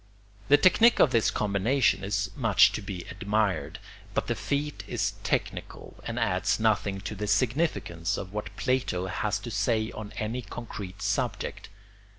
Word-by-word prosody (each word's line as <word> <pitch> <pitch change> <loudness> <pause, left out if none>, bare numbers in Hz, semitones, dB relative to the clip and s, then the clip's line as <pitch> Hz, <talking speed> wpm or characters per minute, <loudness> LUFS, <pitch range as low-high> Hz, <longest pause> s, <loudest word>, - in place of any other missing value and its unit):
The 145 - +7
technique 220 +9 +5
of 135 - +6
this 115 -3 +3
combination 105 +4 +1
is 100 -1 -1
much 105 -4 +5
to - - -4
be 95 -3 -6
admired; 100 0 -1 0.4
but - - +1
the - - 0
feat 145 +1 -2
is 110 -4 -1
technical - - -3
and 115 - -4
adds 100 -5 +1
nothing 100 -3 +1
to 95 - -5
the 105 +1 -4
significance 120 - 0
of 95 +2 -6
what 100 -2 -5
Plato 125 -9 0
has 95 +3 -1
to 120 - -7
say 110 +1 0
on 105 -1 -7
any 110 +4 -2
concrete 100 -4 -7
subject. - - -2
105 Hz, 155 wpm, -28 LUFS, 100-120 Hz, 0.4 s, The